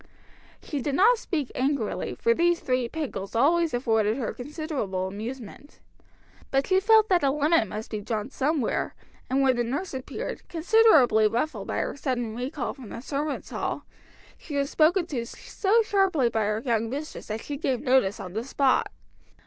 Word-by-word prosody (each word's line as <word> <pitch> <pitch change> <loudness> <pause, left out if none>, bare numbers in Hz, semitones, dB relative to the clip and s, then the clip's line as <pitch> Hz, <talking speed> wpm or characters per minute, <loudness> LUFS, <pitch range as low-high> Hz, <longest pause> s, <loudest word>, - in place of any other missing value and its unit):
She 290 -3 -4
did 280 +1 -1
not 450 +7 +5
speak 300 - -3
angrily, 265 -4 -1
for 465 - +2
these 345 -3 +2
three 255 -2 -1
pickles 240 -11 -5
always 325 +7 +3
afforded 225 -3 +1
her 250 - -3
considerable 260 - -4
amusement. 225 +7 -8 0.7
But 270 0 +1
she 375 0 +3
felt 440 +2 +5
that 360 -2 +4
a 280 - +3
limit 295 -3 +2
must 215 +3 -7
be 215 -2 -3
drawn 220 +3 -3
somewhere, 285 -3 -1 0.3
and 270 +1 +2
when 260 -1 +4
the 240 - +1
nurse 280 +10 -3
appeared, 260 0 -6
considerably 320 - +5
ruffled 240 +8 -2
by - - -2
her - - -3
sudden 245 -5 -2
recall 255 +3 -3
from 250 -6 -11
the - - -7
servants' 285 +2 -3
hall, - - -3 0.5
she 295 - -7
was 280 0 0
spoken 335 +3 +3
to 270 -9 -3
so 415 - 0
sharply 385 - +2
by 220 -2 0
her 215 +2 -1
young 230 -2 0
mistress 290 +5 -6
that 220 +1 -4
she 290 - -5
gave 265 -4 -1
notice 255 -6 +2
on 180 - -7
the 220 +3 -2
spot. 270 0 +1
270 Hz, 175 wpm, -26 LUFS, 230-315 Hz, 0.7 s, not